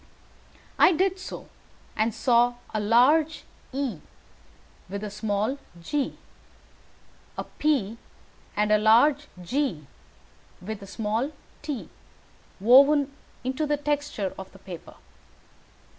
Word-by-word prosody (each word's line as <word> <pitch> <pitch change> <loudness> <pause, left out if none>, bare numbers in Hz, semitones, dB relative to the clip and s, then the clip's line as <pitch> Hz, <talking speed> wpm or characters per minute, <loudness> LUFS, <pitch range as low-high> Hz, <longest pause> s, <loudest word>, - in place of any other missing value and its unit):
I - - +7
did 375 +3 +1
so, 370 - -8 0.5
and 220 +1 +1
saw 240 +2 +3 0.2
a 215 - 0
large 260 +9 +4 0.3
E 260 - -2 0.9
with 200 +2 -5
a 210 - -4
small 210 +5 -1 0.2
g, 275 - -2 1.2
a - - -2
P 235 -8 -1 0.6
and 210 0 +2
a 215 - +5
large 270 +8 +4 0.2
G 210 - -1 0.7
with 210 +3 -6
a 195 - -9
small 220 +6 -2 0.3
t 290 -6 -4 0.7
woven 275 +6 +6 0.3
into 265 +4 -1
the 295 0 +1
texture 290 -9 -2
of 190 - -9
the - - -13
paper. 185 -3 -10
240 Hz, 110 wpm, -26 LUFS, 210-290 Hz, 1.2 s, I